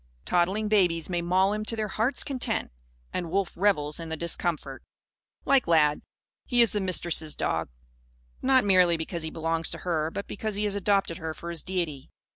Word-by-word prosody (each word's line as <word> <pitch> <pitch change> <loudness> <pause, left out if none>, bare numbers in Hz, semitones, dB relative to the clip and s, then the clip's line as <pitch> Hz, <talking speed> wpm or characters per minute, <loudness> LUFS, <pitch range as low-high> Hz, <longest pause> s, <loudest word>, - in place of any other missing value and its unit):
Toddling 190 +5 +1
babies 180 -5 +2
may 175 -1 0
maul 185 +3 +2
him 215 0 -2
to 230 - -2
their 215 -1 -2
hearts' 225 +7 0
content; 265 - -2 0.4
and 175 -2 -3
Wolf 195 +1 0
revels 170 -7 +1
in 165 -1 -6
the 160 - -3
discomfort. 160 -4 -2 0.6
Like 275 -6 +3
Lad, 150 -3 +3 0.4
he 245 -2 +4
is 230 - +3
the 210 - -1
Mistress' 170 -4 +1
dog. 80 0 -1 0.7
Not 260 -3 +4
merely 180 -3 +5
because 165 +1 -4
he 160 - -3
belongs 165 +1 -1
to - - -4
her; 160 -3 0
but 200 +4 -5
because 215 0 -4
he 205 - -1
has 205 -1 0
adopted 200 -3 +1
her 160 -1 -4
for 170 +3 -6
his 165 -3 -4
deity. 170 -7 -3
175 Hz, 185 wpm, -27 LUFS, 165-205 Hz, 0.7 s, merely